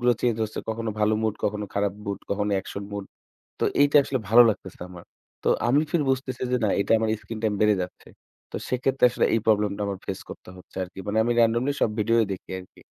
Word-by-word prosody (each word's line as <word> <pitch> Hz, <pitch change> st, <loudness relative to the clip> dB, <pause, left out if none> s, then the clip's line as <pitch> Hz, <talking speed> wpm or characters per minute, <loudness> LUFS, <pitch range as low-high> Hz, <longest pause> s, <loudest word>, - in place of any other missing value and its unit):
গুলো 120 Hz, 0 st, +4 dB
change 120 Hz, -2 st, +1 dB
হচ্ছে। 110 Hz, -, -7 dB
কখনো 110 Hz, 0 st, -2 dB
ভালো 105 Hz, +1 st, +3 dB
mood, 110 Hz, -1 st, 0 dB
কখনো 105 Hz, 0 st, -1 dB
খারাপ 100 Hz, -1 st, +1 dB
mood, 100 Hz, -1 st, -3 dB
কখনো 105 Hz, +1 st, 0 dB
action 100 Hz, +1 st, -7 dB
mood। 100 Hz, -1 st, -4 dB, 0.6 s
তো -, -, 0 dB, 0.2 s
এইটা 145 Hz, +1 st, +5 dB
আসলে 135 Hz, -1 st, -2 dB
ভালো 115 Hz, +3 st, +9 dB
লাগতেছে 95 Hz, -3 st, -5 dB
না 90 Hz, -, -4 dB
আমার। 90 Hz, -1 st, -11 dB, 0.4 s
তো -, -, -1 dB, 0.2 s
আমি 135 Hz, +4 st, +4 dB
ফের 170 Hz, -, +1 dB
বুঝতেছি 130 Hz, -1 st, -2 dB
যে 125 Hz, -, +3 dB
না, -, -, +3 dB
এইটা 100 Hz, -, 0 dB
আমার 110 Hz, 0 st, 0 dB
screen 115 Hz, -1 st, -6 dB
time 105 Hz, -2 st, +1 dB
বেড়ে 105 Hz, -1 st, +5 dB
যাচ্ছে। 90 Hz, -, -8 dB, 0.4 s
তো -, -, -5 dB
সেক্ষেত্রে 130 Hz, +1 st, +2 dB
আসলে -, -, +1 dB
এই 115 Hz, -, +3 dB
problem 105 Hz, -1 st, +3 dB
টা -, -, -4 dB
আমার 100 Hz, -1 st, -3 dB
face 95 Hz, -, -5 dB
করতে -, -, -10 dB
হচ্ছে 90 Hz, -, -17 dB
আরকি। 90 Hz, +1 st, -10 dB
মানে 105 Hz, +1 st, -1 dB
আমি 120 Hz, -, +1 dB
randomly 120 Hz, +4 st, +3 dB
সব -, -, +4 dB
video 115 Hz, +2 st, +2 dB
ই -, -, -1 dB
দেখি 95 Hz, -, -10 dB
আরকি। 90 Hz, -, -19 dB
110 Hz, 230 wpm, -25 LUFS, 100-120 Hz, 0.6 s, ভালো